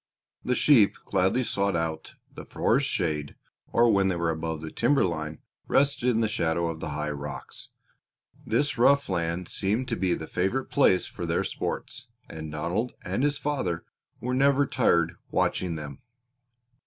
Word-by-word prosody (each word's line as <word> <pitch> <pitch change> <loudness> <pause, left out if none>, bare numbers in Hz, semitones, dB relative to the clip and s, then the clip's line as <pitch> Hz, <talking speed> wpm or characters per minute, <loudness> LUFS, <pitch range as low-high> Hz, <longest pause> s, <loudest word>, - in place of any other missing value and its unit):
The 125 - 0
sheep 120 -9 +5
gladly 95 +6 +2
sought 100 -4 0
out 80 -1 -3 0.2
the - - -8
forest 135 +4 +1
shade 75 -6 -2 0.4
or, 120 - +4
when 100 -1 +3
they 95 - +1
were 85 -1 0
above 80 -1 -4
the 80 - -6
timber 135 +1 +2
line, 80 -3 -3 0.3
rested 135 -3 +2
in 115 -2 +2
the 110 - +2
shadow 85 -5 0
of 80 - -8
the 80 - -4
high 75 +1 -2
rocks. 70 0 -7 0.7
This 120 +2 0
rough 140 +1 +4
land 85 -1 -1
seemed 110 +7 0
to 115 - 0
be 95 -4 +1
the 80 - -6
favorite 95 +11 -1
place 95 -10 +4
for - - -6
their - - +1
sports, 120 - -4 0.2
and 80 -1 -7
Donald 85 +10 -2
and - - -2
his 145 0 +1
father 95 - -2 0.3
were 125 +1 -3
never 140 +2 +4
tired 85 -11 +2
watching 90 -3 0
them. 75 -3 -7
95 Hz, 165 wpm, -27 LUFS, 80-125 Hz, 0.7 s, sheep